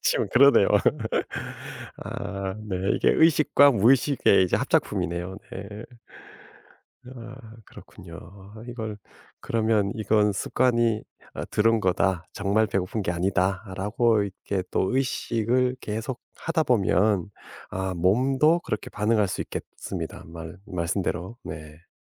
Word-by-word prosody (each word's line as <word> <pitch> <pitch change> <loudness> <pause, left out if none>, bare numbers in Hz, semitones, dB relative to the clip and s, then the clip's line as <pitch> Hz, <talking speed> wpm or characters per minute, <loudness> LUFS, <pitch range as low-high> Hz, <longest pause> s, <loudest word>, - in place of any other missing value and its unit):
지금 - - +1
그러네요. 140 -6 +6 1.3
아 100 -1 -5
네. 95 - -2 0.2
이게 - - +3
의식과 150 -3 +5
무의식의 120 -2 +4
이제 90 - +1
합작품이네요. 85 +3 -1 0.2
네. 100 +3 -7 1.3
아 120 -1 -11
그렇군요. 85 -3 -13 0.5
이걸 110 -3 -5 0.4
그러면 110 -3 +1
'이건 105 -2 +2
습관이 115 +1 +1 0.3
어 - - -4
들은 115 +1 +3
거다 95 -1 +1
정말 100 +2 +1
배고픈 100 +1 -2
게 90 - -1
아니다.'라고 95 +5 0
이렇게 100 -1 -4
또 95 - 0
의식을 125 -1 0
계속하다 125 +8 -3
보면 100 - +2 0.4
아 95 0 -3
몸도 130 - +3
그렇게 105 - -4
반응할 105 -1 +1
수 - - -4
있겠습니다 - - -7
말 80 +1 -9
말씀대로. 90 +4 -3
네. 80 +1 -9
105 Hz, 250 characters per minute, -25 LUFS, 95-120 Hz, 1.3 s, 그러네요